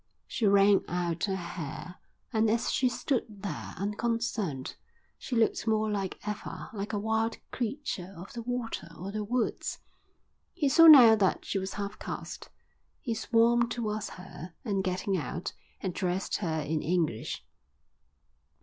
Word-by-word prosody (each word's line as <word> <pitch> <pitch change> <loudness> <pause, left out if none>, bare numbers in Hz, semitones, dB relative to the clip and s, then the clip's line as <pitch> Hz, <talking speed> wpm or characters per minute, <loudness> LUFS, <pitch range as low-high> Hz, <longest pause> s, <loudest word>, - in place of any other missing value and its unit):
She 220 - 0
wrung 200 0 +5
out 175 0 -1
her 195 -2 -1
hair, 170 -1 -6 0.3
and 220 0 +3
as 230 +1 +1
she 255 - +3
stood 235 -6 -2
there, 175 -8 -5
unconcerned, 210 - -2 0.4
she 250 - -4
looked 225 0 +2
more 215 -1 +2
than 195 -2 -1 0.2
ever 210 -1 -5
like 205 0 -4
a 210 - -1
wild 220 +2 0
creature 230 -7 -3
of 180 +4 -9
the 235 - -5
water 235 -7 -3
or 190 +3 -5
the 215 0 -2
woods. 235 +2 -1 0.8
He 300 -6 +2
saw 330 +4 +8
now 250 -8 +11
that 195 -3 +1
she 195 - -1
was 190 0 -4
half 200 0 -5
caste. - - -6 0.5
He 235 - -2
swam 235 +1 +3
towards 215 -3 -2
her 175 -2 -10
and, 200 -4 0
getting 185 +1 0
out, 170 +1 -4 0.3
addressed 185 0 -1
her 160 -5 -1
in 155 +1 -1
English. 160 -8 -1
205 Hz, 145 wpm, -30 LUFS, 180-230 Hz, 0.8 s, now